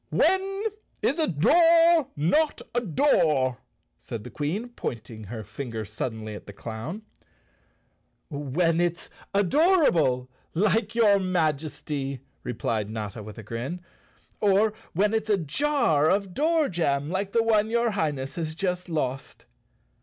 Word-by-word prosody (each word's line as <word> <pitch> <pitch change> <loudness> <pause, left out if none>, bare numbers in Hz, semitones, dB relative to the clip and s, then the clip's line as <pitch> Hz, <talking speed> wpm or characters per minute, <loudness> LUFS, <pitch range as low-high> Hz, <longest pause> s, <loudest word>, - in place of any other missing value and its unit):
" - - -44
When 390 +1 +1 0.4
is 305 - +1
a 315 - +3
door 330 - +5
not 295 - +1
a 240 - +1
door?" 155 - +2 0.4
asked 110 - -7
the - - -9
Queen, 185 +12 -3
point¬ 120 - -5
ing 110 -1 -9
her 110 +2 -6
finger 110 +1 -6
suddenly 110 +1 -5
at 105 - -10
the 100 - -9
clown. 115 - -6 1.2
"When 160 +3 0
it's 175 -1 -2 0.2
adorable, 200 - +3 0.3
like 215 +4 +1
your 210 -4 +5
Majesty," 150 -6 -2 0.2
replied 110 -3 -2
Notta 110 -1 -5
with 105 -1 -10
a 115 - -8
grin. 120 - -4 0.3
" - - -36
Or 205 +1 +3 0.2
when 205 +5 +2
it's 220 0 -1
a 205 - +4
jar 170 - +2
of 195 -1 0
door 315 - +2
jam, 150 - 0
like 190 +1 -2
the 230 +1 +3
one 220 -1 +3
your 235 0 +1
Highness 145 -8 -2
has 160 -2 -3
just 180 0 -2
lost!" 135 -5 -3
170 Hz, 140 wpm, -26 LUFS, 130-220 Hz, 1.2 s, door